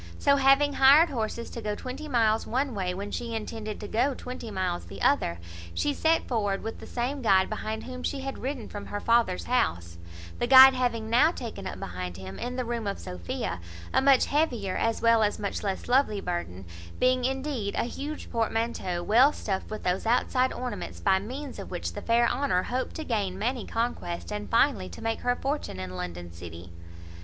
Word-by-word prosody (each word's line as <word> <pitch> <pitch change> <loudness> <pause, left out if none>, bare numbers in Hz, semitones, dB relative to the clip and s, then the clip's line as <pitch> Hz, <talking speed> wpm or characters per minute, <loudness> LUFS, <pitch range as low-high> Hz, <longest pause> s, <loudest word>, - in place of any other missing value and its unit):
So, 280 0 +4
having 275 +1 +4
hired 285 +6 +7
horses 230 -1 -3
to 235 - -6
go 210 -1 -2
twenty 260 +7 -7
miles 225 -5 +2
one 265 +2 0
way, 185 -3 -1
when 200 +3 -5
she 235 -1 -4
intended 215 -1 -5
to 205 - -5
go 250 +6 +1
twenty 250 -2 -7
miles 185 - -2
the 85 - -10
other, 85 - +2 0.4
she 290 - +1
set 320 +3 +2
forward 205 -5 -1
with 225 +1 -5
the - - -10
same 255 +3 -2
guide 190 -4 +3
behind 215 0 -4
whom 255 0 -7
she 275 +1 -2
had 270 0 -5
ridden 265 -3 -4
from 205 - -7
her 205 - -4
father's 230 -5 +2
house; 85 - -1 0.4
the 240 - 0
guide 265 +1 +10
having 240 -3 -1
now 245 +8 +5
taken 225 - -6
up - - -6
behind 90 0 -5
him, 95 0 -8
in 250 +1 -4
the 255 -1 -2
room 230 -2 -3
of 200 - -2
Sophia, 85 0 -4 0.3
a - - +4
much 270 -1 +5
heavier, 245 -11 0
as 230 0 0
well 230 -1 +5
as 210 -1 +1
much 205 -1 -3
less 195 -2 -3
lovely 245 -4 +3
burden; 135 - -4 0.3
being, 255 0 +3
indeed, 265 -5 -2
a - - +1
huge 290 +5 -6
portmanteau, 225 -6 -1
well 245 +9 +5
stuffed 195 -9 -4
with 215 - -6
those 180 +4 0
outside 255 +2 +2
ornaments, 250 -1 -5
by 190 -1 +3
means 260 +7 -7
of - - -7
which - - -4
the - - -6
fair 235 +1 +3
Honour 250 -11 +1
hoped 255 +5 -3
to 315 - -4
gain 205 -8 -1
many 235 +3 -2
conquests, 225 -6 -3
and, 210 0 -4
finally, 230 -5 +2
to 230 - -10
make 225 0 -1
her 245 0 +1
fortune 275 - -3
in 90 0 -6
London 90 -1 -6
city. 85 0 -10
230 Hz, 200 wpm, -27 LUFS, 195-255 Hz, 0.4 s, guide